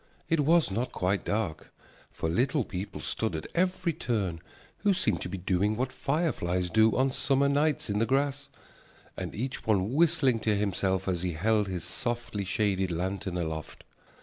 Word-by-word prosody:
It 165 - +2
was 155 -4 +4
not 115 +6 -1
quite 95 +2 0
dark, 100 -7 -2 0.4
for - - -3
Little 130 - +1
People 95 +2 -5
stood 110 -7 -1
at 80 - -4
every 180 -1 +1
turn 100 - -2 0.4
who 200 -2 +3
seemed 185 - 0
to - - -4
be 95 - -4
doing 95 +3 +1
what 130 +3 -1
fireflies 90 - -1
do 110 0 +4
on 130 +1 +3
summer 140 +1 +2
nights 145 +1 +1
in 105 0 0
the 115 - +2
grass, 140 +1 0 0.7
and - - -5
each 130 +3 -4
one 105 +1 +2
whistling 150 -6 +3
to 110 -1 +1
himself 95 -1 0
as 90 -3 0
he 90 -1 -1
held 105 +5 +2
his 90 -3 -4
softly 120 -4 -3
shaded 95 -1 +1
lantern 90 +1 -2
aloft. 80 -2 -4
110 Hz, 170 wpm, -29 LUFS, 95-135 Hz, 0.7 s, was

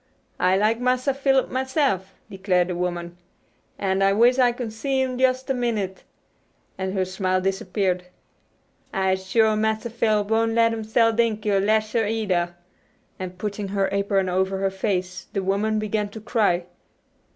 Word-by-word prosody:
"I 185 +1 +3
likes 215 +3 +2
Massa 255 +2 +1
Philip 270 -1 +1
myse'f," 260 - 0
declared 185 -2 0
the 180 - -2
woman, 175 -1 -3 0.6
"an' 190 -1 0
I 195 0 +4
wishes 240 +5 +4
I 245 -1 +5
could 235 -2 -5
see 265 +4 -1
him 260 -1 0
jus' 260 +1 +1
a 270 - +1
minute," 220 -7 -2 0.7
and 190 +1 -3
her 190 -1 +1
smile 185 0 0
disappeared. 185 -1 -1 0.9
"I'se 190 -1 0
shuah 220 -2 +4
Massa 220 +1 -1
Philip 215 -3 +1
won' 225 0 +2
let 230 0 +4
'em 225 -1 -4
sell 225 +1 +3
Dinkie, 215 -2 0
or 195 - +3
lash 215 +2 +1
her 225 -3 +1
either," 185 -6 -1 0.6
and 185 -1 -6
putting 205 +1 -4
her 195 0 0
apron 200 -1 +1
over 190 +1 0
her 195 0 0
face 185 -2 -3
the 195 - -1
woman 205 +3 0
began 215 -1 -1
to 220 - -9
cry. 205 -6 +1
210 Hz, 165 wpm, -23 LUFS, 190-230 Hz, 0.9 s, I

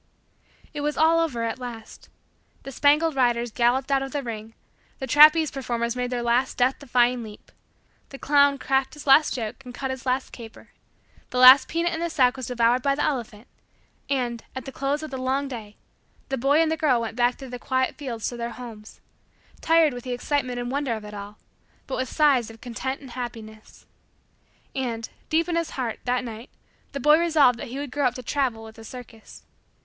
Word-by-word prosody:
It 295 - -4
was 295 +1 -2
all 325 +1 +4
over 275 -9 -1
at 230 +2 -3
last. 235 -3 -9 0.5
The 275 - -7
spangled 295 +4 +3
riders 240 -2 +1
galloped 255 +4 +1
out 270 -1 +3
of 270 0 -5
the 285 -1 -2
ring; 225 -2 -7 0.4
the 265 - -5
trapeze 305 +3 +6
performers 235 -3 -3
made 250 0 -2
their 245 -1 -2
last 240 +3 +1
death 255 +2 +2
defying 245 -2 +1
leap; 215 -2 -12 0.6
the 275 - -9
clown 285 0 +3
cracked 270 +1 0
his 295 - -11
last 290 +2 +5
joke 230 +1 -5
and 250 -1 -10
cut 265 0 -3
his 260 -1 -6
last 255 +1 -1
caper; 225 -2 -12 0.6
the 250 - -4
last 255 +1 +9
peanut 340 +1 -1
in 320 - -3
the 340 0 -2
sack 260 -5 +2
was 260 -3 -6
devoured 245 0 +2
by 275 +1 +1
the 295 - -1
elephant; 240 -5 -3 0.6
and, 245 -4 -2
at 260 - -6
the 270 - -7
close 280 +3 -2
of 310 - -7
the 265 - -5
long 265 +2 -1
day, 220 -5 -8 0.5
the 270 - 0
boy 275 +5 +3
and 320 - 0
the 320 - 0
girl 290 -6 +2
went 225 -1 -4
back 245 0 +2
through 265 -2 -10
the 245 0 -7
quiet 260 +1 0
fields 245 -6 -5
to 245 - -8
their 235 0 -4
homes; 225 -4 -11 0.6
tired 325 -3 +4
with 245 -1 -8
the 250 - -4
excitement 250 0 -2
and 245 0 -4
wonder 275 -4 -1
of 215 -1 -8
it 210 - -9
all 205 +1 -9 0.5
but 265 - -4
with 260 0 -2
sighs 275 -7 +3
of 225 0 -13
content 255 +3 -5
and 265 -3 -11
happiness. 220 -3 -9 0.9
And, 235 -4 -3 0.2
deep 330 +2 +1
in 345 - -1
his 335 -1 -1
heart, 240 -4 -3
that 250 0 0
night, 230 +1 -8 0.4
the 280 - -5
boy 300 +4 +5
resolved 300 -8 +3
that - - -6
he 250 +3 -7
would 285 -2 -5
grow 285 0 +1
up 245 - -3
to 255 - -7
travel 245 -4 -1
with 220 0 -12
a - - -11
circus. 230 -1 -12
255 Hz, 205 wpm, -24 LUFS, 235-280 Hz, 0.9 s, last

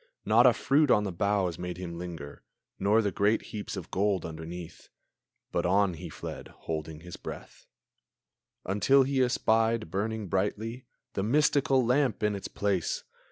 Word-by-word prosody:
Not - - +6
a - - +6
fruit 145 +1 +3
on 105 -4 +5
the 100 - -2
boughs 95 -1 0
made 90 -1 -4
him 85 -2 -6
linger, 80 -5 -7 0.4
Nor 105 +3 +3
the 100 - 0
great 105 +4 +2
heaps 105 -1 -5
of 90 - -7
gold 95 -2 +1
underneath. 80 +1 -8 0.6
But - - 0
on 95 +1 +3
he 80 - -8
fled, - - -7
holding 80 -1 -6
his 90 0 -9
breath, - - -9 1.0
Until 105 +8 +4
he 135 0 +1
espied, 115 -5 +2
brightly 110 +2 -2
burning, 110 +6 -1 0.3
The - - -1
mystical 135 +2 +3
lamp 125 -3 +2
in 105 0 +2
its 100 - -5
place! 100 -5 -1
100 Hz, 155 wpm, -29 LUFS, 90-115 Hz, 1.0 s, Not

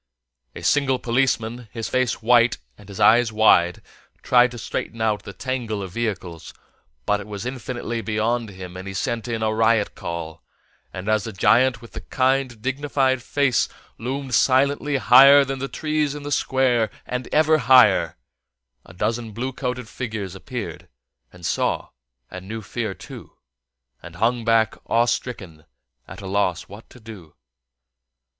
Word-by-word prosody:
A - - -9
single 135 -3 +2
policeman, 120 -2 -1
his 115 -2 -5
face 130 -3 -1
white 120 +1 +4 0.2
and 105 -1 -17
his 100 - -9
eyes 120 0 +5
wide, 90 -5 +3 0.4
tried 125 0 +5
to 120 - -10
straighten 115 0 -5
out 110 -2 0
the - - -9
tangle 120 -6 -4
of 95 - -7
vehicles, 95 -7 -5 0.5
but 105 - +1
it 105 - -9
was 105 +1 -6
infinitely 120 -2 -4
beyond 110 +1 -1
him 95 -2 -10
and 95 +1 -8
he 95 - -6
sent 115 +3 -2
in 115 -2 -2
a 110 0 +1
riot 110 -1 +2
call; 85 -1 -6 0.5
and 95 +2 -7
as 110 -1 +1
the 115 - -5
giant 125 +5 +3
with 115 - -13
the - - -8
kind, 130 -3 0
dignified 135 -1 0
face 135 0 +1 0.3
loomed 130 +3 -4
silently 140 +3 +2
higher 135 +4 +7
than 135 0 -4
the 135 - -3
trees 150 -1 -2
in 145 - -8
the 145 - -6
Square, 125 -5 +1 0.2
and 125 0 -4
ever 155 0 +4
higher, 130 0 +5 0.7
a 90 - -16
dozen 110 +3 -2
blue 130 +4 -4
coated 125 -2 -4
figures 110 -7 -5
appeared, 95 - -7 0.4
and 90 -2 -12
saw, - - -1 0.4
and 95 0 -9
knew 110 +1 -6
fear 110 -2 -4
too, - - -12 0.7
and 85 0 -11
hung 115 +5 0
back 115 -1 +2
awe 115 +1 +3
stricken, 95 -10 -4 0.4
at - - -10
a - - -9
loss 95 -3 0
what 105 +3 -14
to 125 - -16
do. 105 -9 -12
115 Hz, 160 wpm, -22 LUFS, 105-130 Hz, 0.7 s, higher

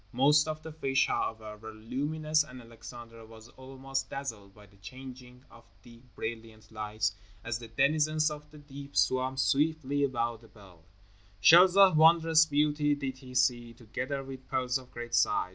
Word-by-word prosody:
Most 150 +5 +4
of 155 0 -5
the 160 - -8
fish, 135 -3 +1
however, 110 -1 -3
were 110 +1 -10
luminous, 150 +7 -1
and 130 -4 -12
Alexander 115 0 -12
was 110 +1 -15
almost 135 +1 -6
dazzled 110 -8 -7
by 105 - -16
the 100 0 -23
changing 125 +3 -12
of 115 - -16 0.2
the 115 -1 -16
brilliant 110 -1 -7
lights 105 -1 -2 0.3
as 115 0 -3
the 115 - -10
denizens 155 +6 +1
of 150 0 -9
the 150 - -15
deep 140 -1 -10
swam 130 +1 +1
swiftly 145 0 +1
around 120 -3 -3
the 115 - -17
bell. 95 -6 -18 0.6
Shells 175 - +7
of 195 -5 +6
wondrous 160 0 +5
beauty 150 0 +1
did 135 -2 -5
he 130 -1 -12
see, 120 -2 +1
together 130 +5 -5
with 130 -1 -10
pearls 130 0 -1
of 130 -1 -16
great 120 0 -8
size. 90 - +2
130 Hz, 165 wpm, -29 LUFS, 115-150 Hz, 0.6 s, Shells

